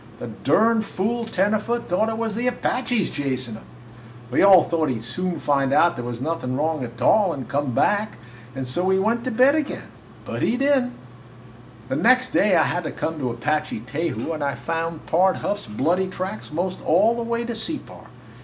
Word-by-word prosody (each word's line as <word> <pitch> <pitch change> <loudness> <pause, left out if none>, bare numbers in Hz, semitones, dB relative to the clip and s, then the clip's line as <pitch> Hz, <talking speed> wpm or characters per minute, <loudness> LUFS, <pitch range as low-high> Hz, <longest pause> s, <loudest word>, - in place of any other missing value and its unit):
The 120 - -7
durn 220 +10 +3
fool 220 +3 -2
tenderfoot 215 +3 0
thought 200 +6 +1
it 225 - -3
was 225 -2 -2
the 240 +4 -1
Apaches 245 -3 -1
chasin' 130 -5 -3
him! 110 - -10 0.7
We - - +2
all 195 -2 +8
thought 160 -3 0
he 130 - 0
'd 110 - -8
soon 175 +9 -2
find 140 -2 +1
out 170 +4 +4
there 120 - -5
was 120 -1 -5
nothin' 130 -3 -2
wrong 155 -1 -1
a - - -3
tall 180 - +2
and 135 -3 -6
come 140 -3 -1
back, 210 +1 +1 0.4
and 135 -1 -4
so 150 +8 -1
we 190 +1 +3
went 225 +4 +1
to - - 0
bed 255 +4 +4
again. 305 -2 -3 0.3
But - - -5
he 245 - +1
did 275 -1 +3
n't. 250 - -7 0.9
"The 130 +1 -2
next 255 +2 +3
day 200 -3 +3
I 160 - +5
had 175 - -1
to - - -3
come 160 -1 -4
to 130 -3 -1
Apache 150 0 -2
Teju 160 +6 -3
and 155 -2 -4
I 140 -1 -1
found 165 -1 -4
Pard 185 +3 +3
Huff's 205 -10 -3
bloody 165 - 0
tracks 185 +1 -5
most 180 +4 -3
all 205 +9 +3
the 235 - -3
way 235 0 -2
to 235 - -3
Separ. 295 +8 -6
180 Hz, 200 wpm, -23 LUFS, 145-225 Hz, 0.9 s, all